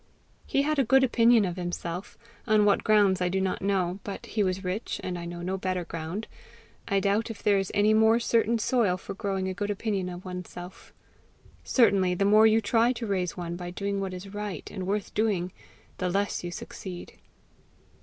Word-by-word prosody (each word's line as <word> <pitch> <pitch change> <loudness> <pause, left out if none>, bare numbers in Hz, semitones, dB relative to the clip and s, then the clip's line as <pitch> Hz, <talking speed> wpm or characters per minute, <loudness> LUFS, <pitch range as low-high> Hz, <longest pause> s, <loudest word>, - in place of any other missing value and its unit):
He 275 - +2
had 305 0 0
a - - +5
good 265 +3 +4
opinion 235 -3 +4
of 180 -1 -4
himself 175 0 -5 0.3
on 215 -2 +4
what 205 - +3
grounds 205 -4 +4
I 180 - +2
do 190 +2 0
not 190 -1 -1
know; 190 -2 0
but 200 - -6
he 220 - -2
was 190 -1 0
rich, 185 +5 -3
and 180 - -3
I 170 -1 -5
know 175 0 -6
no 190 +2 -2
better 185 -2 -2
ground; 165 +6 -5 0.6
I 195 - +2
doubt 205 +4 +1
if 225 - -8
there 205 -1 +4
is 195 - -2
any 210 +1 +4
more 220 +1 +5
certain 230 0 +2
soil 225 -5 +1
for - - -7
growing 195 -2 -2
a 190 - -2
good 205 +2 -3
opinion 200 -3 -2
of 180 +1 -8
oneself. 180 0 -8 0.7
Certainly, 195 -7 +3
the 195 - +1
more 215 +2 +6
you 220 +1 +4
try 230 +3 +3
to 235 -1 -5
raise 185 -4 -1
one 170 -1 -4
by 175 0 -6
doing 200 +2 -3
what 190 -1 -3
is 195 +2 -9
right 205 -1 -5
and 185 -2 -5
worth 205 0 -2
doing, 200 -5 0 0.5
the 185 - 0
less 200 +1 -1
you 175 - -3
succeed. 175 +1 -8
195 Hz, 200 wpm, -27 LUFS, 180-215 Hz, 0.7 s, more